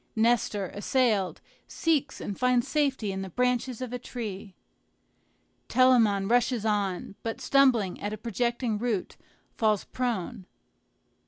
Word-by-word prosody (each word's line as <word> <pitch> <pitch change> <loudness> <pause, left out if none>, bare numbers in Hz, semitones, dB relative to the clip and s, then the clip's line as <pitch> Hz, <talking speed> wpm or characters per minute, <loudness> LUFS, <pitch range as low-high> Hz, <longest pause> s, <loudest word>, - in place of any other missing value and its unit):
Nestor, 220 -4 +1
assailed, 210 -3 +1 0.3
seeks 300 -4 0
and 205 - -4
finds 250 0 +2
safety 275 -9 0
in 190 0 -4
the 190 - -5
branches 250 +3 0
of 250 -1 -6
a 250 - -3
tree. 210 -6 -7 1.1
Telamon 230 -7 +4
rushes 240 -1 +2
on, 200 -4 -1
but 225 +2 -4
stumbling 255 -8 +3
at 205 - -3
a 215 - -4
projecting 235 0 -1
root, 225 -5 -2 0.4
falls 215 -3 +1
prone. 235 -5 -3
230 Hz, 120 wpm, -27 LUFS, 205-250 Hz, 1.1 s, Telamon